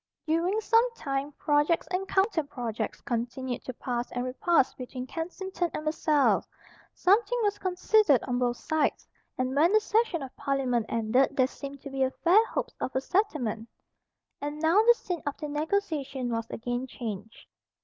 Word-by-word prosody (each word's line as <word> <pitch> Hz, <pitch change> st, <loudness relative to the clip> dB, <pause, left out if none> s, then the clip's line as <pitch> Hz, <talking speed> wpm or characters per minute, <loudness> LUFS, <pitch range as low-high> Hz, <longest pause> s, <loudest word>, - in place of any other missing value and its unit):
During 335 Hz, +6 st, +1 dB
some 460 Hz, +3 st, +3 dB
time 275 Hz, -5 st, -3 dB
projects 295 Hz, +4 st, +2 dB
and 375 Hz, +1 st, -1 dB
counterprojects 280 Hz, -, -1 dB
continued 245 Hz, 0 st, -3 dB
to 255 Hz, -, -4 dB
pass 245 Hz, 0 st, -3 dB
and 245 Hz, 0 st, -2 dB
repass 270 Hz, +3 st, +2 dB
between 255 Hz, 0 st, -6 dB
Kensington 350 Hz, +4 st, -3 dB
and 305 Hz, -, -4 dB
Versailles. 305 Hz, -2 st, +2 dB, 0.5 s
Something 460 Hz, +6 st, +3 dB
was 410 Hz, -1 st, 0 dB
conceded 365 Hz, -, +3 dB
on 245 Hz, -1 st, -1 dB
both 245 Hz, -1 st, 0 dB
sides; 315 Hz, -2 st, -1 dB, 0.3 s
and 255 Hz, +1 st, -1 dB
when 320 Hz, +5 st, +5 dB
the 435 Hz, -, +6 dB
session 430 Hz, -7 st, +1 dB
of 260 Hz, -, -9 dB
Parliament 265 Hz, -5 st, 0 dB
ended 240 Hz, +5 st, +2 dB
there 260 Hz, -, +5 dB
seemed 280 Hz, +1 st, -8 dB
to 280 Hz, -, -8 dB
be 265 Hz, -1 st, +1 dB
fair 375 Hz, +6 st, +6 dB
hopes -, -, -3 dB
of 260 Hz, -, -3 dB
a -, -, +3 dB
settlement. 270 Hz, -, -1 dB, 0.7 s
And 290 Hz, +1 st, -4 dB
now 330 Hz, +6 st, +4 dB
the 475 Hz, +2 st, +6 dB
scene 355 Hz, -7 st, -4 dB
of 285 Hz, -, -2 dB
the 305 Hz, -, -5 dB
negotiation 295 Hz, -5 st, -2 dB
was 230 Hz, 0 st, -2 dB
again 245 Hz, +2 st, -3 dB
changed. 220 Hz, -4 st, -7 dB
285 Hz, 160 wpm, -28 LUFS, 250-355 Hz, 0.7 s, the